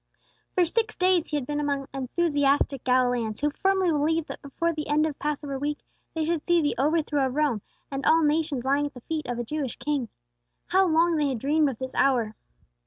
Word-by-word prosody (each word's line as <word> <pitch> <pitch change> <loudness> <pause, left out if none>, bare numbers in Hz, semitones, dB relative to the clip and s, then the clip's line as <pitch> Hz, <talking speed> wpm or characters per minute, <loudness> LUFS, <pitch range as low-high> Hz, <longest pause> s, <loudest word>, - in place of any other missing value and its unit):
For 360 - +4
six 435 +6 -1
days 365 -2 +3
he 300 - -1
had 275 - -3
been 295 +1 -2
among 280 -2 -1
enthusiastic 280 -1 +1
Galileans 245 -4 +1
who 295 +1 +1
firmly 380 +2 +1
believed 315 +2 0
that - - -7
before 335 +4 -2
the 305 -1 -4
end 300 +1 +2
of 305 -3 -4
Passover 290 -2 -3
week 295 +1 -2 0.4
they 320 -1 0
should 330 -1 -1
see 345 -1 +3
the 290 -2 +1
overthrow 295 -1 +1
of 255 - -5
Rome, 290 -8 +1 0.3
and 275 0 -3
all 325 0 +4
nations 300 -3 +1
lying 285 +2 +2
at 290 - -12
the 250 - -10
feet 315 +4 -4
of 245 -1 -3
a 240 - -2
Jewish 275 0 -3
king. 285 -6 -2 0.6
How 380 +1 +3
long 330 0 +3
they 295 -2 +1
had 260 - -2
dreamed 295 +5 +2
of 255 - -6
this 260 +1 -6
hour! 240 -6 +2
295 Hz, 210 wpm, -26 LUFS, 270-320 Hz, 0.6 s, For